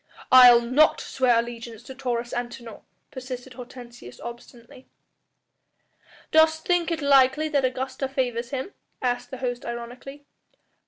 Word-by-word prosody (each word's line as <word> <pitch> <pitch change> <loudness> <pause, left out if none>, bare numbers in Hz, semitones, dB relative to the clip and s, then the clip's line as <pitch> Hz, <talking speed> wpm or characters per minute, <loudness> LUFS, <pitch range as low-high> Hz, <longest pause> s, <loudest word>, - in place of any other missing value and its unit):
"I'll 245 -2 +9
not 260 +6 +3
swear 250 -3 +1
allegiance 230 -1 -5
to 265 - -10
Taurus 245 -2 -4
Antinor," 240 -2 -6 0.3
persisted 255 0 -8
Hortensius 240 - -12
obstinately. 235 +1 -12 1.4
"Dost 315 0 +3
think 355 -2 +1
it 325 -3 -3
likely 275 +2 +4
that 285 -2 +1
the 260 - +2
Augusta 260 +1 -4
favours 245 -3 -2
him?" 270 +8 -5 0.3
asked 245 -1 -2
the 260 - -7
host 245 -1 -4
ironically. 245 +4 -8
255 Hz, 125 wpm, -24 LUFS, 240-270 Hz, 1.4 s, I'll